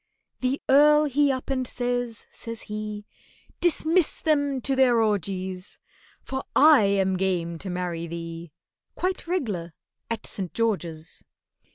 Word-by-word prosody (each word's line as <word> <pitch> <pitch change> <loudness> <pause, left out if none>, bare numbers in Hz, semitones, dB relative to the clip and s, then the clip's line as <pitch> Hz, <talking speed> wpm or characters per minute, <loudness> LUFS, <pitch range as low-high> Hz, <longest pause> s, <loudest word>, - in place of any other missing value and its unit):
The 255 +2 0
Earl 300 +2 +6
he 290 0 +2
up 260 +1 -4
and 260 -2 0
says, 245 -2 -3
says 230 -1 -8
he, 210 -1 -5 0.5
"Dismiss 340 0 +2
them 285 -3 +1
to 270 +2 +1
their 250 -3 +4
orgies, 190 -3 -2 0.5
For 265 0 -4
I 295 -7 +7
am 190 -1 +2
game 175 -3 -1
to 190 - -5
marry 175 -2 -3
thee 165 0 -7 0.4
Quite 365 -1 -2
reg'lar 205 - -2 0.4
at 230 -1 -3
St. 185 -4 -4
George's." 170 -8 -2
225 Hz, 130 wpm, -25 LUFS, 185-270 Hz, 0.5 s, I